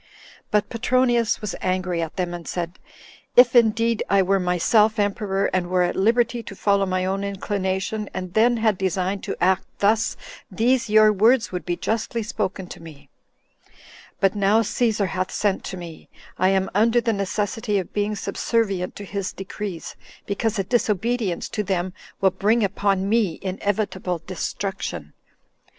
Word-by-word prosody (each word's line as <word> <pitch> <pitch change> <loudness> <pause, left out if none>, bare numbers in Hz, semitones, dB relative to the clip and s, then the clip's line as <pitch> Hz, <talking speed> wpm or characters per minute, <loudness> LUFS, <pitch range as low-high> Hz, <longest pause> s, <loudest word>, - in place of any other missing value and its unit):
But 210 -1 +1
Petronius 240 -1 +1
was 210 -4 -3
angry 185 -2 -1
at 160 -1 -4
them, 180 -2 -2
and 170 -1 -7
said, 175 0 -4 0.6
"If 245 0 +7
indeed 230 -1 +3
I 200 -1 +4
were 195 +1 +2
myself 210 +5 +3
emperor, 200 -1 0
and 185 -1 0
were 180 0 +2
at 175 - -1
liberty 235 +4 +2
to 200 - -9
follow 200 0 +2
my 185 0 0
own 195 +1 -1
inclination, 200 +1 -2
and 185 -1 -6
then 235 +3 +4
had 220 -4 +1
designed 190 +1 -1
to - - -4
act 185 +1 +2
thus, 215 +2 +2 0.3
these 240 +1 +1
your 215 0 +6
words 225 +4 +3
would 180 0 -5
be 175 - 0
justly 225 +3 -2
spoken 205 -3 -3
to - - -9
me; 145 -4 -13 1.1
but 195 -1 +3
now 205 +2 +3
Cæsar 215 -3 0
hath 185 +1 -2
sent 200 -2 0
to 190 - -5
me, 170 -2 -10 0.3
I 185 +1 +2
am 190 0 +1
under 225 +4 +4
the 230 -1 0
necessity 205 +2 -1
of 185 - -4
being 210 0 0
subservient 200 -3 -1
to 205 - -8
his 195 -1 -3
decrees, 195 -2 -6 0.3
because 215 +2 -1
a 195 - +1
disobedience 220 -2 0
to 210 - -2
them 185 -2 -2 0.3
will 190 -1 +4
bring 215 +5 +2
upon 195 -1 0
me 210 -6 +1
inevitable 190 -2 -2
destruction." 185 - -4
200 Hz, 160 wpm, -23 LUFS, 185-220 Hz, 1.1 s, If